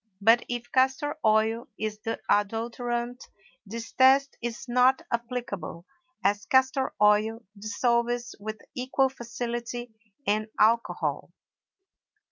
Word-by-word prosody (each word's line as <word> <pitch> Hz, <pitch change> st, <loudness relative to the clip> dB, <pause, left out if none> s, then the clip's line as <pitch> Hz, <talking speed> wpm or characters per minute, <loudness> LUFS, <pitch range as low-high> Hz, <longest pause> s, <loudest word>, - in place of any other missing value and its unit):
But 225 Hz, +4 st, +5 dB
if 240 Hz, 0 st, -4 dB
castor 265 Hz, +3 st, +2 dB
oil 220 Hz, +1 st, +2 dB
is 215 Hz, -1 st, -3 dB
the 225 Hz, +1 st, -3 dB
adulterant, 235 Hz, +3 st, -1 dB, 0.4 s
this 230 Hz, +2 st, -6 dB
test 270 Hz, +1 st, +5 dB
is 240 Hz, +2 st, -5 dB
not 250 Hz, +2 st, +4 dB
applicable, 235 Hz, -8 st, -4 dB, 0.4 s
as 205 Hz, +1 st, +1 dB
castor 260 Hz, 0 st, +2 dB
oil 215 Hz, +2 st, +3 dB
dissolves 235 Hz, +3 st, 0 dB
with 215 Hz, +1 st, -5 dB, 0.2 s
equal 265 Hz, +1 st, +1 dB
facility 240 Hz, -1 st, -5 dB, 0.3 s
in 215 Hz, 0 st, +1 dB
alcohol. 230 Hz, +2 st, +2 dB
235 Hz, 100 wpm, -27 LUFS, 215-250 Hz, 0.4 s, But